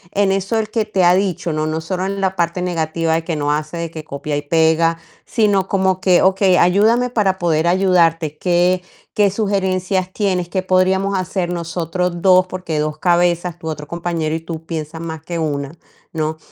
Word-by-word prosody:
en 200 -1 +3
eso, 195 +3 -1
¿él 215 -1 -3
que 220 -1 -1
te 190 -3 0
ha 175 0 +6
dicho?, 185 -3 -1
¿no?, 155 0 -1
no 160 +1 -2
solo 180 +3 -3
en 195 0 -3
la 190 0 0
parte 170 +1 0
negativa 165 -2 -1
de 165 0 -2
que 165 - -2
no 145 -1 -1
hace 150 +2 -2
de 170 -1 -4
que 155 -2 -8
copia 145 0 -4
y 145 - -4
pega, 160 +2 +2 0.3
sino 205 -5 +1
como 190 -2 +1
que: 185 -2 +3
"Okey, 190 0 +3
ayúdame 220 +7 +3
para 205 -6 +1
poder 165 -2 +1
ayudarte. 170 -4 +2
¿Qué 180 +1 +2 0.3
qué 205 -1 +3
sugerencias 190 -2 -1
tienes? 185 -4 0
¿Qué 185 0 -2
podríamos 190 +1 +2
hacer 180 0 -2
nosotros 170 +1 -3
2? 185 0 +5
Porque 180 -4 -4
2 150 0 -2
cabezas" 175 0 +1
tu 160 - -8
otro 150 -1 -5
compañero 170 -2 -2
y - - -2
tú 165 -1 -7
piensan 160 0 -5
más 160 -2 -6
que 170 +1 -5
1, 145 -2 -2 0.4
¿no? 155 -1 -2
175 Hz, 195 wpm, -18 LUFS, 160-190 Hz, 0.4 s, ha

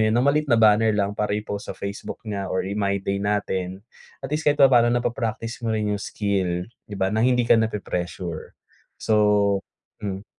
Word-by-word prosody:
yun 110 +1 +3
ng 125 - +3
maliit 150 0 0
na 120 - +4
banner 110 0 +4
lang 100 0 0
para 105 0 -1
i-post 105 -1 -5
sa - - -5
Facebook 100 +3 -6
niya 100 -3 -4
or 95 - -1
i-my 100 0 -1
day 100 0 -2
natin, 100 -2 -2 0.4
at 135 - -5
least 150 0 +1
kahit 145 - +3
papaano 125 -4 +6
napa-practice 120 -1 -2
mo 115 -2 -1
rin 105 -1 0
yung 100 - -2
skill 95 -4 -1 0.2
di 105 - -6
ba, 95 +1 0
na 110 - +1
hindi 125 0 +3
ka - - +4
napi-pressure. 90 -6 -4 0.4
So, 105 -2 +2 0.4
hmm 100 0 -4
105 Hz, 185 wpm, -24 LUFS, 100-115 Hz, 0.4 s, papaano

